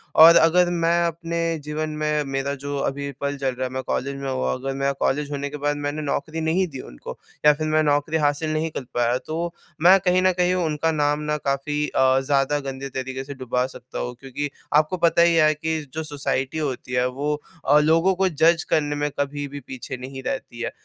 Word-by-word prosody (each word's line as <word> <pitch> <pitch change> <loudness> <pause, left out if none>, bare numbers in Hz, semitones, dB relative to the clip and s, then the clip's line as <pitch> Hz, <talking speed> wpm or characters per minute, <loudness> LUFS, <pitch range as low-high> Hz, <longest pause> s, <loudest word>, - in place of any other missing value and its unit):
और 165 +2 +9
अगर 175 +2 +5
मैं 170 -1 +2
अपने 170 0 -4 0.3
जीवन 155 +1 -3
में, 150 0 -1
मेरा 135 0 -2
जो 140 +1 -5
अभी 140 +1 -2
पल 140 0 -2
चल 135 -1 -1
रहा 130 +1 -2
है, - - -8
मैं 130 0 -3
कॉलेज 140 +2 -2
में 135 0 -4
हूँ 130 -1 -1
अगर 135 +1 -3
मेरा 135 +1 0
कॉलेज 145 +1 0
होने 145 0 -3
के 150 - -6
बाद 145 0 0
मैंने 145 +1 -3
नौकरी 155 +2 -2
नहीं 170 +4 +1
दी 135 -5 -8
उनको - - -10 0.3
या 150 - +8
फिर 155 +1 -3
मैं 155 0 +3
नौकरी 145 +2 +1
हासिल 150 +1 0
नहीं 155 +1 0
कर 140 - -5
पाया 120 0 +2
तो 170 +2 -3 0.3
मैं 185 +4 +7
कहीं 185 0 +2
न 185 0 +4
कहीं 180 0 +3
उनका 160 -2 0
नाम 150 -1 +1
न 150 - +1
काफ़ी 145 +2 0
अ, 130 0 +3
ज़्यादा 140 +1 +1
गंदे 135 -1 -6
तरीक़े 130 0 -4
से 140 +1 -7
डुबा 125 -1 -1
सकता 130 -1 -9
हूँ 125 0 -4
क्योंकि 140 +2 -4 0.2
आपको 155 +4 +3
पता 170 0 +3
ही 170 0 +5
है 155 -1 +5
कि 160 +1 -2
जो 160 - -3
सोसाइटी 145 -2 -2
होती 135 -4 -3
है 125 0 +2
वो 145 +4 -2 0.3
अ, 145 +2 +6
लोगों 165 +5 +3
को 190 +1 +2
जज 165 +1 +3
करने 145 -1 +1
में 145 0 -1
कभी 145 0 -2
भी 145 +1 -7
पीछे 130 0 -7
नहीं 130 +1 -8
रहती 120 - -4
है। - - -2
145 Hz, 220 wpm, -23 LUFS, 135-160 Hz, 0.3 s, और